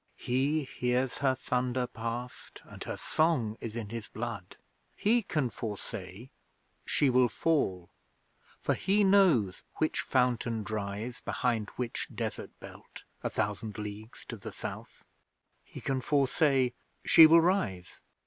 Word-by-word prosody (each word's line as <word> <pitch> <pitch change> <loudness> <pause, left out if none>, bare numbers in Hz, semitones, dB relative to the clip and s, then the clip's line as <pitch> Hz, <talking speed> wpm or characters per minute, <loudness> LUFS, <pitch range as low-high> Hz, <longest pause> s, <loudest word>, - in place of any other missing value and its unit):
He 140 +5 +1
hears 125 -1 -1
Her 135 -2 +2
thunder 125 0 -1
past 120 +1 -6
And - - -9
Her - - -4
song 150 -10 +1
is 115 -1 -5
in 110 -4 -4
his 115 -2 -5
blood. - - -6 0.4
He 235 +3 +3
can 150 - -1
foresay: 105 +1 -7 0.6
'She 140 -3 +3
will 125 -1 +4
fall,' 95 - 0 0.7
For - - +2
he 205 +2 +2
knows 185 - +4
which 155 - 0
fountain 120 -4 +1
dries 105 +3 -4
Behind 115 -4 -1
which 125 -2 -3
desert - - -4
belt - - -12 0.2
A - - -1
thousand 105 +1 -2
leagues 105 +2 -8
to 115 - -5
the 100 - -8
South. - - -8 0.6
He - - -10
can 135 -1 -1
foresay: 135 -2 +2 0.3
'She 160 -1 +9
will 165 +1 +7
rise.' 110 - -1
125 Hz, 130 wpm, -30 LUFS, 110-140 Hz, 0.7 s, She